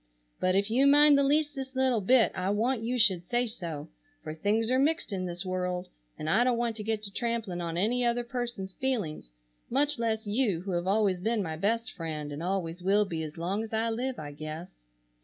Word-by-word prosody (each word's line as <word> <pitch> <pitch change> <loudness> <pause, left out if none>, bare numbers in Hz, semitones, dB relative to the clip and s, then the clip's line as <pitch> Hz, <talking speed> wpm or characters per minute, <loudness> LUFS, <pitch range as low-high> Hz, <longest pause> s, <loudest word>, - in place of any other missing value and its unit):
But 185 0 +2
if 200 +2 +1
you 265 +4 +4
mind 290 +1 +7
the 280 - +4
leastest 280 -2 0
little 260 -4 +2
bit 235 +4 +4
I 185 0 -2
want 225 +4 +1
you 240 +3 -1
should 190 -7 +4
say 240 +7 0
so, 165 -10 -6 0.4
for 155 -1 -5
things 215 +8 0
are 255 - +3
mixed 305 -5 +1
in 185 -1 -2
this 175 +1 -4
world 180 0 -2 0.3
and 155 - -5
I 210 +9 +4
don't 250 -1 +2
want 235 -1 -1
to 210 - -4
get 220 0 -2
to 200 - -5
trampling 225 -7 -2
on 170 -1 -3
any 235 +7 +1
other 240 0 +1
person's 235 -6 -4
feelings, 200 - -3 0.4
much 285 +1 +1
less 220 -1 -1
you 205 -5 +1
who 195 +1 -5
have 175 0 -1
always 200 -2 +2
been 220 +1 0
my 160 -3 -4
best 230 +8 0
friend 155 -4 -5
and 145 +2 -5
always 180 -1 -2
will 200 +3 +3
be 165 -4 -4
as 155 0 -6
long 185 +5 -1
as 225 0 -7
I 225 +1 +1
live 250 +2 -2
I 145 -1 -6
guess. 155 +4 -7
210 Hz, 215 wpm, -29 LUFS, 180-240 Hz, 0.4 s, mind